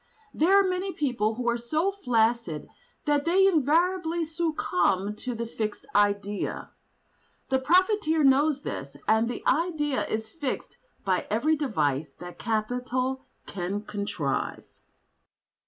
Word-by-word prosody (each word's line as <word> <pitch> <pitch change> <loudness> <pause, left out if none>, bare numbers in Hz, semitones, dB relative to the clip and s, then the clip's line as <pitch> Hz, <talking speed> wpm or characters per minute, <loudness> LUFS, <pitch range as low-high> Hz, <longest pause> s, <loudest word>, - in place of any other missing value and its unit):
There 375 +6 +5
are 395 - +3
many 370 +1 -1
people 230 -7 0
who 245 0 -4
are 235 0 +1
so 310 +11 0
flaccid 230 - 0 0.4
that 290 -1 +2
they 370 +4 +4
invariably 340 +1 +2
succumb 210 - 0
to 250 +1 -4
the 235 +1 -3
fixed 215 -2 -4
idea. 205 0 0 0.8
The 265 0 +2
profiteer 335 +1 +3
knows 285 +1 +4
this, 140 +1 -6
and 220 +2 +3
the 245 - -6
idea 295 -2 +1
is 220 0 -3
fixed 290 -6 -4 0.3
by 185 -2 0
every 260 +9 +2
device 155 - -1
that 175 0 -10
capital 250 +4 -2 0.2
can 195 +2 -4
contrive. 200 -10 -3
255 Hz, 125 wpm, -27 LUFS, 210-315 Hz, 0.8 s, There